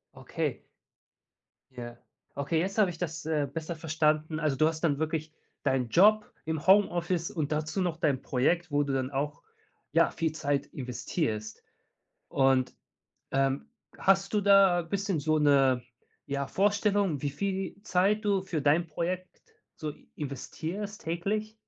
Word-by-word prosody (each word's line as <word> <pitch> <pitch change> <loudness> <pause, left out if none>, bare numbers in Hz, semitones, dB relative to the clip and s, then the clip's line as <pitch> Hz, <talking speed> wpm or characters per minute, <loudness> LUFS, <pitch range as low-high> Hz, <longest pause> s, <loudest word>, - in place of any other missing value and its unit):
Okay. - - -3 1.1
Ja. 120 -1 -8 0.4
Okay, 140 +4 0
jetzt 195 +5 -2
habe 210 -4 +4
ich 170 - -7
das, 160 -2 -4
äh, 150 -3 0
besser 165 +3 -4
verstanden. 155 0 0
Also, 155 -4 +1
du 155 +3 +4
hast 160 0 -3
dann 145 -4 +2
wirklich 155 0 -2 0.3
deinen 130 -3 +1
Job 210 - +5
im 160 -1 -3
Homeoffice 175 -3 +3
und 155 -7 -2
dazu 155 +5 -1
noch 175 -3 -1
dein 145 -5 +1
Projekt, 165 +7 0
wo 145 0 +3
du 140 -1 -2
dann 130 0 -1
auch, 145 +2 -3 0.5
ja, - - +4
viel 160 -1 -1
Zeit 145 -2 -1
investierst. 120 -4 -4 0.7
Und, 135 -1 +2 0.6
ähm, 135 - +1 0.3
hast 195 0 +3
du 210 - +3
da 195 -3 +5
bisschen 195 +1 -2
so 155 +2 +2
'ne, 135 -4 +4 0.4
ja, 140 0 -2
Vorstellung, 200 -3 +1
wie 145 - 0
viel 190 +6 -3
Zeit 205 +2 +2
du 200 -2 +2
für 170 -6 -3
dein 155 +4 +3
Projekt 180 +4 -4 0.3
so 155 -2 -5 0.2
investierst 165 +8 -5
täglich? 200 +7 -2
160 Hz, 145 wpm, -29 LUFS, 145-185 Hz, 1.1 s, Job